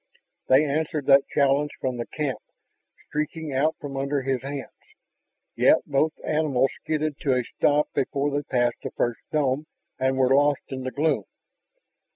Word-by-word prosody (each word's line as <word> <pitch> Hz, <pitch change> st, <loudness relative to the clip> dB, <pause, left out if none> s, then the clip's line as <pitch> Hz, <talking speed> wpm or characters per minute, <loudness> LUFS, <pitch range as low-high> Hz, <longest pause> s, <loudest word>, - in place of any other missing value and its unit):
They 135 Hz, +4 st, +5 dB
answered 150 Hz, 0 st, -1 dB
that 140 Hz, 0 st, +5 dB
challenge 140 Hz, +1 st, +2 dB
from 130 Hz, -2 st, -2 dB
the 120 Hz, -, -4 dB
camp, 145 Hz, -4 st, -3 dB, 0.7 s
streaking 155 Hz, 0 st, -3 dB
out 150 Hz, +4 st, +2 dB
from 140 Hz, -2 st, -7 dB
under 140 Hz, 0 st, -1 dB
his 130 Hz, -1 st, -1 dB
hands. 140 Hz, 0 st, -6 dB, 0.8 s
Yet -, -, +4 dB
both 150 Hz, +3 st, +1 dB
animals 145 Hz, -4 st, +1 dB
skidded 155 Hz, -2 st, -2 dB
to 135 Hz, -3 st, +1 dB
a 125 Hz, -, 0 dB
stop 150 Hz, +5 st, +1 dB
before 140 Hz, +2 st, 0 dB
they 145 Hz, +1 st, 0 dB
passed 120 Hz, -3 st, 0 dB
the -, -, -4 dB
first 120 Hz, -1 st, -1 dB
dome 145 Hz, 0 st, 0 dB, 0.3 s
and 130 Hz, 0 st, +1 dB
were 130 Hz, 0 st, +4 dB
lost 145 Hz, 0 st, +3 dB
in 130 Hz, -1 st, -5 dB
the -, -, -1 dB
gloom. 150 Hz, +4 st, 0 dB
140 Hz, 160 wpm, -25 LUFS, 130-150 Hz, 0.8 s, They